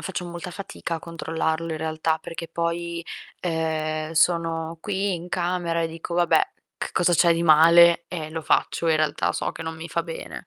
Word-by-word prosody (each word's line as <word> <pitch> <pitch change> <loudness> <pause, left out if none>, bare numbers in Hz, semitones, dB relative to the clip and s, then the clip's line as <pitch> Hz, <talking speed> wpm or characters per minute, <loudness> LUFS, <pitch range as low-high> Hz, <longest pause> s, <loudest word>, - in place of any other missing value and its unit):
faccio 185 -1 -4
molta 175 +1 -7
fatica 185 -2 -5
a 165 - -2
controllarlo 165 0 -2
in 160 - -2
realtà 160 0 -1
perché 165 +1 -7
poi, 170 0 -3 0.4
ehm, 160 -2 -2
sono 165 0 +1
qui 195 0 -1
in 175 +1 -7
camera 175 -2 -1
e - - +1
dico: 165 +1 -6
"Vabbè, 175 - +3 0.3
che - - -3
cosa 175 0 +2
c'è 170 0 +5
di 170 - -1
male?" 170 +2 +7
E 160 -4 -5
lo 160 0 -4
faccio, 165 +1 +1
in 160 - +4
realtà 155 -1 0
so - - -2
che - - -7
non 160 0 -5
mi 165 +1 -7
fa 170 - -1
bene. 165 +1 -8
165 Hz, 190 wpm, -24 LUFS, 160-175 Hz, 0.4 s, male